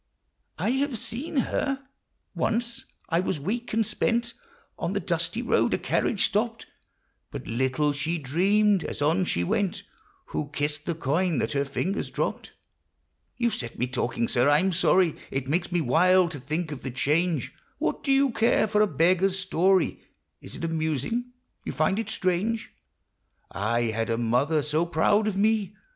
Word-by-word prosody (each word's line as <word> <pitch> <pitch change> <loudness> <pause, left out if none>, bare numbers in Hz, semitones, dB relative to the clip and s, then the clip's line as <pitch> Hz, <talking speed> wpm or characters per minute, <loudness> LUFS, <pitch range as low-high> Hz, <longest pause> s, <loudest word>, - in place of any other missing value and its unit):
I - - 0
have 265 -1 0
seen 260 +10 -5
her? 270 +1 0 0.5
Once: 235 +1 -1 0.2
I 165 -1 +2
was 180 -3 -1
weak 235 - -3
and 225 0 +2
spent 235 +3 0 0.5
On - - -2
the - - 0
dusty - - -1
road; - - +2
a - - -1
carriage 210 - +1
stopped; 225 +2 -1 0.6
But - - -7
little 130 +5 0
she 155 +4 -1
dreamed, 190 +7 +2
as 145 - -3
on 165 +5 +2
she 85 - 0
went, 190 - -1 0.5
Who 145 - -3
kissed 145 +1 -1
the 170 - 0
coin 165 +3 0
that 110 - -1
her 140 0 +1
fingers 160 +8 -2
dropped! - - -3 0.9
You 235 -1 +1
've - - -4
set 120 -2 -4
me 125 - +1
talking, 120 -2 -1
sir; 125 +3 +3
I 145 - +6
'm 190 +4 +2
sorry; 180 -1 +3
It 135 -1 -3
makes 175 +5 0
me 175 -1 +1
wild 175 +6 +4
to 145 - -6
think 155 +5 -3
of 140 - -6
the 135 - -4
change! 155 +6 0 0.2
What - - -2
do 275 - +1
you 270 -1 +4
care 230 -1 +3
for 210 0 +2
a 215 - +5
beggar's 185 +2 +2
story? 185 -1 +2 0.4
Is - - -8
it - - -7
amusing? 160 - -1 0.4
you - - -4
find 190 +7 +1
it 225 -1 -3
strange? 210 +3 -1 0.8
I 110 +4 0
had 115 +1 -2
a 115 - +1
mother 125 +7 +1
so 150 +3 +1
proud 205 +6 +2
of 200 -3 -1
me 210 -1 +1
175 Hz, 170 wpm, -26 LUFS, 145-210 Hz, 0.9 s, I